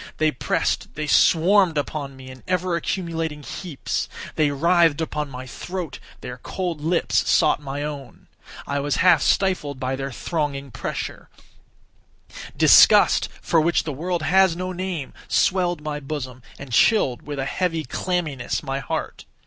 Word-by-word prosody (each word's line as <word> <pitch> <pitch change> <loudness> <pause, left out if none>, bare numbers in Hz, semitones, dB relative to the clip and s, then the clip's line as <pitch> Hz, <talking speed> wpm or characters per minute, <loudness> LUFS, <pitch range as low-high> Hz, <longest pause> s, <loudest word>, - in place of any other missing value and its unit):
They 155 0 +2
pressed—they 150 +2 -2
swarmed 170 +3 +4
upon 145 -1 -3
me 130 0 -11
in 130 - -13
ever 180 -1 0
accumulating 165 -3 -3
heaps. 160 -1 -4 0.2
They 155 -2 +2
writhed 165 +1 +3
upon 150 -2 -3
my 130 -1 -8
throat; 175 +3 -6 0.2
their 125 0 -7
cold 175 +1 -4
lips 165 +3 +1
sought 150 - +3
my 140 0 -4
own; 140 -5 -8 0.4
I 140 0 -2
was 145 0 -1
half 170 -5 +6
stifled 165 -8 +1
by 130 +1 -2
their 135 +1 -4
thronging 140 -1 -3
pressure; 120 - -5 1.3
disgust, - - +6
for 165 - +3
which 170 +2 +2
the 155 - -4
world 170 +4 -2
has 190 +1 +4
no 185 +1 -4
name, 180 -6 -4
swelled 175 -3 +1
my 150 -1 -3
bosom, 135 -3 -6 0.2
and 140 -3 -9
chilled, 135 - +3
with 145 -1 -6
a 135 - -2
heavy 165 +1 -1
clamminess, 160 -8 -2
my 135 -1 -3
heart. - - -5
155 Hz, 145 wpm, -23 LUFS, 140-175 Hz, 1.3 s, half